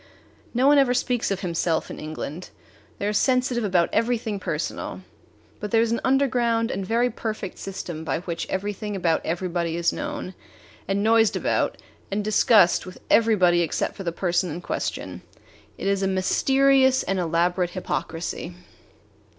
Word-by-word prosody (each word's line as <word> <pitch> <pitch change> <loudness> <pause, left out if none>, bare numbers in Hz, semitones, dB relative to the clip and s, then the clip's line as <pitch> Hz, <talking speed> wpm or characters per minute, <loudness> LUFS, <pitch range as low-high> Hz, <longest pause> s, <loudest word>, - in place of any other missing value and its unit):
No 250 +2 +1
one 285 0 +6
ever 250 -2 +3
speaks 245 -1 0
of 195 -1 -2
himself 170 -2 -1
in - - -8
England. 155 +2 -6 0.5
They - - -3
are 210 - 0
sensitive 250 +1 +2
about 185 -4 +2
everything 225 -3 0
personal. - - -4 0.6
But 210 - -4
there 225 +2 +4
is 230 - -1
an 230 - 0
underground 245 -3 +2
and 195 - -3
very 235 +5 +1
perfect 215 -4 -5
system 175 -4 -6
by 160 0 -2
which 170 -2 -4
everything 205 +2 -3
about 170 -4 +1
everybody 170 -1 -2
is 170 0 +1
known 290 -9 -5 0.5
and 195 +1 0
noised 225 0 +4
about - - 0 0.3
and 205 +1 -1
discussed 210 -3 +4
with 185 - -10
everybody 185 -7 +4
except 170 - -2
the 170 - -1
person 175 +1 0
in 160 +3 -5
question. - - -4 0.6
It - - -6
is 195 0 +1
a 195 - +1
mysterious 265 +7 +3
and 195 0 -1
elaborate 175 +1 +1
hypocrisy. 170 -1 -4
195 Hz, 150 wpm, -24 LUFS, 175-235 Hz, 0.6 s, one